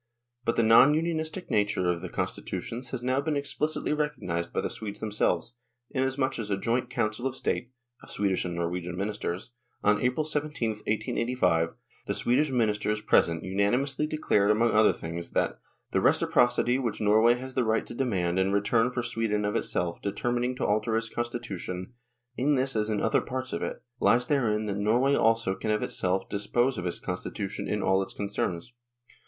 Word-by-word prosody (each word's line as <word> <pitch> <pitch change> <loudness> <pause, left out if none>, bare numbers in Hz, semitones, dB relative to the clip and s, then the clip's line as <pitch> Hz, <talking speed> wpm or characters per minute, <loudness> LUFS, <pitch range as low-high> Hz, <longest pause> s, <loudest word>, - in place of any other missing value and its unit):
But 115 - +1
the 115 - +3
non 115 +6 +7
unionistic 160 +2 -2
nature 100 -3 +1
of 85 -1 -3
the - - -6
con - - 0
stitutions 125 +2 -5
has 125 -2 -4
now 130 +2 +1
been 150 0 -1
explicitly 150 +2 -1
recognised 125 - -2
by - - -1
the - - -2
Swedes 105 -2 -6
themselves, 110 +2 0 0.4
inasmuch 130 -1 0
as 105 -2 -4
at 100 - +1
a - - -8
joint 120 +3 0
Council 120 0 -1
of 130 - -4
State 120 - -2 0.3
(of - - -14
Swedish 95 -2 0
and 90 -1 -4
Norwegian 85 +1 -3
ministers) 100 0 -3 0.3
on 105 +1 +3
April 125 +5 +1
17, 150 -5 -1
1885, 110 -5 0 0.3
the - - -1
Swedish 140 +5 +2
ministers 105 -4 +1
present 85 -5 +2
unanimously 125 +10 +1
declared 105 -10 +1
among 115 +2 +3
other 110 0 +5
things 85 +1 -6
that - - 0 0.2
" - - -47
the - - +2
reciprocity 120 +1 +3
which 120 -4 -2
Norway 110 +3 +5
has 130 +1 -7
the 130 - +1
right 110 0 +1
to - - -8
demand 95 -9 0
in 95 +1 +2
return 105 +4 +2
for 125 -1 -3
Sweden 115 -3 -1
of 105 - -1
itself 85 -1 -1
determining 120 +5 -1
to - - -2
alter 110 +2 +1
its 115 0 -2
constitution, 120 -5 -4 0.4
in 140 +4 +2
this 135 0 0
as 105 0 +1
in 105 -1 0
other 115 - +2
parts 130 0 -4
of - - -2
it, - - -4 0.2
lies 125 +1 +4
therein 110 -7 +1
that 100 -1 -2
Norway 120 +7 +3
also 115 -6 +3
can 110 - -4
of 105 0 +1
itself 95 +1 -1
dispose 120 +4 0
of 90 - -3
its 85 - -2
constitution 95 +3 -4
in 105 -1 -1
all 95 +1 +3
its 95 - -5
concerns." 100 0 -3
115 Hz, 185 wpm, -28 LUFS, 100-125 Hz, 0.4 s, non